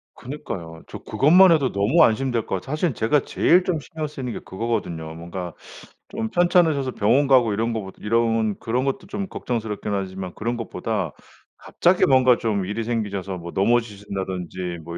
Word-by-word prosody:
그니까요. 85 - -7
저 - - -8
그것만 175 +6 +5
해도 140 -5 +3
너무 105 +12 +3
안심될 120 0 +1
것 - - -2
같아요. 95 +9 -6
사실 155 -3 0
제가 115 +7 +2
제일 180 +2 +3
좀 170 -4 0
신경 155 +1 -5
쓰이는 130 -5 -6
게 - - -5
그거거든요. 95 -7 -4
뭔가 85 +1 -6 0.6
좀 225 +2 -3
편찮으셔서 170 -7 +3
병원 125 +6 +2
가고 125 -6 +4
이런 115 +3 0
거 110 - -2
보다 95 0 -10
이런 115 -1 +1
그런 125 +3 -1
것도 140 +7 -3
좀 200 -1 -4
걱정스럽긴 110 -3 -3
하지만 95 -2 -4
그런 120 +2 -2
것보다 105 -6 -3 0.4
갑자기 180 +1 +2
뭔가 130 -2 +5
좀 105 -5 -1
일이 105 +4 -3
생기셔서 100 -5 -3
뭐 85 0 -8
넘어지신다든지 95 -5 -2
뭐 85 +1 -7
115 Hz, 380 characters per minute, -23 LUFS, 95-135 Hz, 0.6 s, 그것만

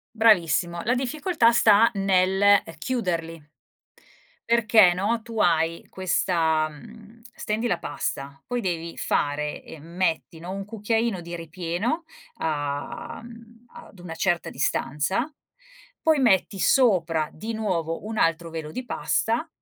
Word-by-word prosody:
Bravissimo. 175 -6 +3
La 245 - +2
difficoltà 265 0 +2
sta 225 -1 +5
nel, 190 -1 +2
ehm, 205 0 +6
chiuderli 165 -6 -3 1.1
perché, 220 -5 +5
no, 205 +6 0
tu 230 -1 -7
hai 165 -1 +1
questa 165 -4 +1
mhmm, 220 +7 -14
stendi 215 +3 -2
la 175 - 0
pasta. 140 -3 -5
Poi 245 0 -2
devi 170 -4 -3
fare 150 +1 -1
ehm, 155 -2 -12
metti, 165 -1 -2
no, 175 +2 -7
1 195 0 -5
cucchiaino 220 0 -1
di 170 0 -7
ripieno 175 - -3 0.3
a 145 -2 -4
mhmm, 230 0 -14
ad 200 - -14
una 175 -2 -7
certa 175 0 0
distanza, 150 - -1 0.7
poi 315 -2 +3
metti 200 -5 +2
sopra 175 - +3
di 220 +8 -6
nuovo 175 -7 -2
un 220 0 -4
altro 165 0 +1
velo 160 -2 -6
di 255 - -5
pasta, 240 +4 -1
185 Hz, 130 wpm, -25 LUFS, 165-225 Hz, 1.1 s, ehm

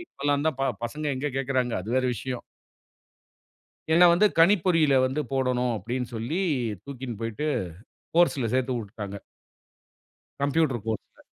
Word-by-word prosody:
இப்பெல்லாந்தான், 145 - -1
ப - - +1 0.2
பசங்க 150 +5 -4
எங்க 140 - -2
கேக்குறாங்க! 130 -2 0
அது 95 - -9
வேற 130 - +2
விஷயம். 125 +3 -5 1.5
என்ன 175 +2 +7
வந்து 195 +5 +5
"கணிப்பொறியில 165 -4 +4
வந்து 135 +4 -2
போடணும்" 125 -2 +1
அப்டின்னு 120 +4 -4
சொல்லி 120 +11 -2 0.4
தூக்கின் 130 -5 -6
போய்ட்டு, 115 +6 -3 0.7
கோர்ஸ்ல 145 -8 +3
சேத்து 130 0 +1
உட்டுட்டாங்க. 100 -2 -7 1.2
கம்ப்யூட்டர் 140 -4 +1
கோர்ஸ்ல. 110 -2 -5
130 Hz, 115 wpm, -26 LUFS, 120-150 Hz, 1.5 s, என்ன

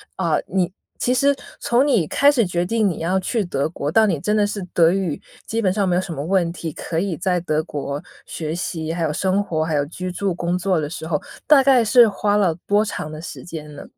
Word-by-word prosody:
啊， 170 -5 +1
你 180 -1 0 0.3
其 250 - +1
实 280 +2 +3 0.3
从 245 +4 +2
你 225 - +3
开 285 - +4
始 240 -7 +2
决 175 0 -1
定 220 +1 +1
你 175 - -2
要 180 +4 +1
去 215 +3 -1
德 140 -4 -1
国， 145 -3 -4
到 220 +3 +5
你 170 -8 0
真 210 +7 0
的 210 -1 +3
是 205 -1 -4
德 165 -1 +5
语 185 -6 -1 0.3
基 230 +1 -1
本 190 -3 +2
上 195 0 0
没 175 - +2
有 180 - +2
什 175 -3 -6
么 140 - -4
问 175 -1 +1
题， 165 -2 -5
可 165 -1 -3
以 190 -3 -1
在 180 -1 0
德 155 -2 -1
国 145 -2 -4 0.3
学 155 -1 -4
习， 165 -2 -3
还 170 -1 -2
有 155 - 0
生 190 +4 +1
活， 160 -4 -1
还 160 -1 -1
有 145 0 +1
居 180 +4 -6
住 190 -1 -2
工 175 +1 -1
作 185 -2 +1
的 150 -1 -3
时 160 -1 -6
候， 150 -3 0 0.3
大 285 -3 +7
概 260 -3 +5
是 240 +1 +7
花 205 0 0
了 185 -5 +3
多 205 +1 +3
长 155 -6 -5
的 155 - -7
时 - - -8
间 150 -3 -8
呢？ - - -9
180 Hz, 265 characters per minute, -21 LUFS, 160-205 Hz, 0.3 s, 大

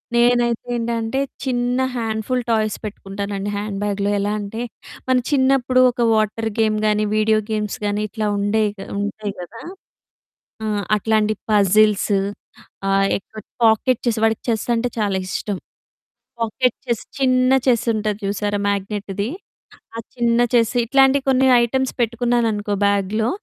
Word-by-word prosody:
నేనైతే 240 -1 +2
ఏంటంటే 230 +1 -1 0.2
చిన్న 245 -1 0 0.2
హ్యాండ్ఫుల్ 225 +2 -1
టాయ్స్ 215 -2 +1
పెట్టుకుంటానండి 200 0 -5
హ్యాండ్ 205 -1 -4
బ్యాగ్‌లో. 200 -1 -1
ఎలా 205 +1 -1
అంటే 205 +3 -5 0.5
మన 260 - +3
చిన్నప్పుడు 260 -2 +3
ఒక 240 - -4
వాటర్ 220 +1 0
గేమ్ 215 -1 +2
గానీ, 210 0 +2
వీడియో 215 0 +3
గేమ్స్ 210 -1 -2
గానీ, 205 +1 0
ఇట్లా 215 +1 -3
ఉండేయి 205 +1 +1 0.3
ఉంటాయి 210 0 -3
కదా! 215 +6 -10 1.0
ఆ! 220 - -2 0.3
అట్లాంటి 215 0 +1 0.2
పజిల్సు 205 0 +4 0.7
ఆహ్, 195 0 +3
ఎక్కువ 215 +2 -12 0.2
పాకెట్ 225 +2 +3
చెస్ 235 -2 +1
వాడికి 225 0 +1
చెస్ 220 -2 0
అంటే 230 +2 0
చాలా 200 -2 0
ఇష్టం. 200 +1 -3 0.8
పాకెట్ 230 +2 0
చెస్ 235 -3 -1 0.2
చిన్న 255 -1 +3 0.2
చెస్ 240 -3 +3
ఉంటది 215 -1 -2
చూసారా? 205 +1 -1
మ్యాగ్నెట్‌ది 200 0 -3 0.7
ఆ - - -5 0.2
చిన్న 235 -1 +2
చెస్ 230 -2 +3
ఇట్లాంటి 270 +3 +4
కొన్ని 265 0 +4 0.2
ఐటెమ్స్ 260 +2 0
పెట్టుకున్నాను 240 0 +1
అనుకో 205 0 -2
బ్యాగ్‌లో. 200 +2 +1
220 Hz, 130 wpm, -20 LUFS, 205-240 Hz, 1.0 s, పజిల్సు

